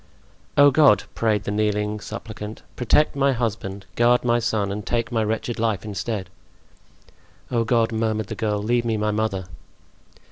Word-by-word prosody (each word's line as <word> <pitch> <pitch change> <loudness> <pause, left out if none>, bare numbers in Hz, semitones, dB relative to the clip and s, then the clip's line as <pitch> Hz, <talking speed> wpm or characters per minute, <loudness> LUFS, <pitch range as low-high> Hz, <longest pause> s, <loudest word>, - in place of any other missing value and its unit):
"Oh, 145 0 +8
God!" 135 -6 +5
prayed 110 -3 +1
the 100 - -3
kneeling 105 0 0
suppliant, 110 -1 -8
"protect 135 +5 +2
my 140 -1 +3
husband, 105 -5 -3
guard 120 +1 +4
my 120 0 +3
son, 110 -4 0
and 105 +1 -4
take 120 +3 -1
my 115 -2 +1
wretched 110 +2 -2
life 110 -5 0
instead!" 105 -2 -4 1.2
"Oh, 120 -2 +2
God!" 115 0 +2
murmured 110 -1 -1
the - - -6
girl, 105 -2 -1
"leave 120 +2 +1
me 115 -2 0
my 105 0 0
mother!" 105 -3 -1
110 Hz, 155 wpm, -23 LUFS, 105-120 Hz, 1.2 s, Oh